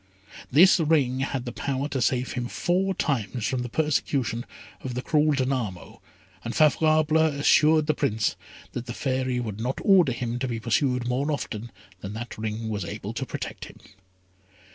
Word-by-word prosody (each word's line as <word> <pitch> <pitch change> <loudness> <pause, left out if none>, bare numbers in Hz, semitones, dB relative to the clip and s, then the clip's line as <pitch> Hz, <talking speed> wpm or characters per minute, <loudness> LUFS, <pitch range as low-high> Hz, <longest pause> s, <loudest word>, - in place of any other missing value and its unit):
This 180 +8 +6
ring 145 -5 +2
had 135 -1 -2
the 120 - -4
power 140 +3 -2
to 135 -3 -2
save 125 +1 +1
him 125 -1 -3
four 185 +7 0
times 120 - -1
from 130 -2 -1
the 125 - -4
persecution 135 -4 -1 0.4
of 125 -2 -4
the 125 - -3
cruel 150 0 +3
Danamo, 130 -9 -2 0.4
and 120 - -4
Favourable 155 0 +4
assured 155 0 +4
the 155 - +2
Prince 110 -8 0 0.4
that 125 0 -6
the 120 - -5
Fairy 130 -2 -1
would 110 -4 -5
not 125 +4 -2
order 185 -8 +5
him 120 0 -3
to 130 - -1
be 115 -2 -3
pursued 125 +2 0
more 135 +5 0
often 120 -5 -4 0.3
than 100 +2 -7
that 115 +2 -6
ring 110 +1 -4
was 105 -3 -2
able 85 - -6
to - - -4
protect - - -6
him. - - -14
130 Hz, 170 wpm, -26 LUFS, 120-150 Hz, 0.4 s, This